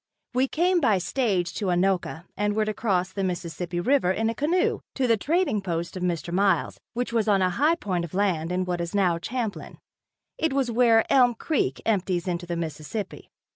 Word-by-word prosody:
We 255 +2 +2
came 350 +5 +2
by 220 -8 +3
stage 185 -3 0
to 205 - -3
Anoka 180 -2 0
and 205 +1 0
were 215 0 +2
to 215 - -2
cross 190 -5 0
the 195 - -2
Mississippi 175 -1 -3
river 255 0 +2
in 225 +4 0
a - - -4
canoe, 325 +8 +1 0.2
to 265 - +1
the 230 -2 +4
trading 300 - 0
post 170 -2 -3
of 185 - -5
Mr. 170 -1 -2
Miles, 190 -3 +1 0.2
which 245 0 -2
was 225 -2 +1
on 195 -3 +3
a 185 - +2
high 300 - +3
point 185 - -2
of 170 +1 -7
land 180 -5 0
in 185 +1 0
what 175 -1 -2
is 170 +3 -4
now 180 -4 +2
Champlin. 225 +2 -4 0.6
It 320 -3 +1
was 270 -3 +1
where 230 -1 +4
Elm 250 -3 +5
creek 225 - -1
empties 185 -4 0
into 175 0 -3
the 170 0 -3
Mississippi. 165 +5 -5
195 Hz, 200 wpm, -25 LUFS, 175-235 Hz, 0.6 s, Elm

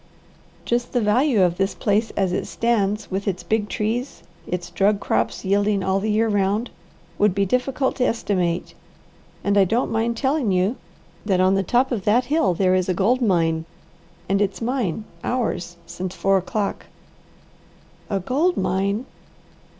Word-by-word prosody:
Just 240 +1 -1
the 245 - +2
value 220 +1 +3
of 175 -1 +1
this 195 +1 0
place 215 +1 +1
as 190 -2 +1
it - - -2
stands, 210 -3 0
with 195 +2 -3
its 185 -2 -2
big 215 -1 -1
trees, 235 +5 -3 0.2
its 175 -1 -4
drug 200 +3 +2
crops 115 - -1
yielding 200 0 +2
all 190 +1 +1
the 215 +2 -2
year 220 +2 +2
round, 205 +2 0 0.5
would 205 -3 +3
be 200 0 +2
difficult 255 +5 0
to 250 - +2
estimate; 180 -6 -1 0.7
and 200 0 +3
I - - +7
don't 225 +7 0
mind 225 +1 0
telling 265 -3 +1
you 185 +6 +1 0.5
that 195 -3 +1
on 185 +1 +4
the 195 - +2
top 245 +8 +1
of 220 -6 -2
that 240 +4 +3
hill 260 - +1
there 185 +1 +2
is 185 0 +1
a 185 - +1
gold 235 +8 +2
mine, 165 -7 +1 0.6
and 195 +1 +1
it's 200 -1 -1
mine 225 -5 -1 0.2
ours 200 -8 -2
since 185 +1 -6
four 195 0 +2
o'clock." 200 +2 -3 1.2
"A 200 - 0
gold 300 - +1
mine!" 200 +5 0
205 Hz, 165 wpm, -22 LUFS, 190-235 Hz, 1.2 s, I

